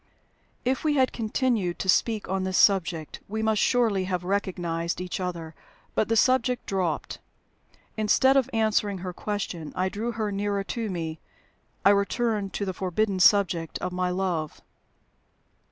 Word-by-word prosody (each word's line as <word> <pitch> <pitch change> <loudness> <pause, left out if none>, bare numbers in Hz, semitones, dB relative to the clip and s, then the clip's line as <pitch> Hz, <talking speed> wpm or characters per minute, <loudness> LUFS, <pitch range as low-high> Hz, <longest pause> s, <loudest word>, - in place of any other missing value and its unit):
If 260 +1 0
we 305 -2 +2
had 260 -2 +2
continued 220 -5 0
to - - -4
speak 215 +3 +2
on 190 0 -1
this 185 0 -1
subject, 175 -6 +2
we 220 +2 -3
must 220 -1 +2
surely 220 -7 +2
have 180 -2 -2
recognized 175 -3 -2
each 180 +1 -4
other. 170 -3 -4 0.4
But - - +1
the 225 - +2
subject 250 +1 +2
dropped. 185 -5 -2 0.8
Instead 260 +5 +4
of 265 -2 +3
answering 215 -3 +1
her 180 - -4
question, 180 -6 -4
I 185 +1 0
drew 225 +5 -3
her 215 -2 -2
nearer 200 0 -1
to 225 +1 -3
me 165 -3 -4 0.7
I 200 - +8
returned 205 0 0
to 200 - -2
the 190 - -3
forbidden 190 +2 -1
subject 180 -4 +3
of 180 - -4
my 180 0 -1
love. 180 -4 -2
200 Hz, 155 wpm, -26 LUFS, 180-220 Hz, 0.8 s, I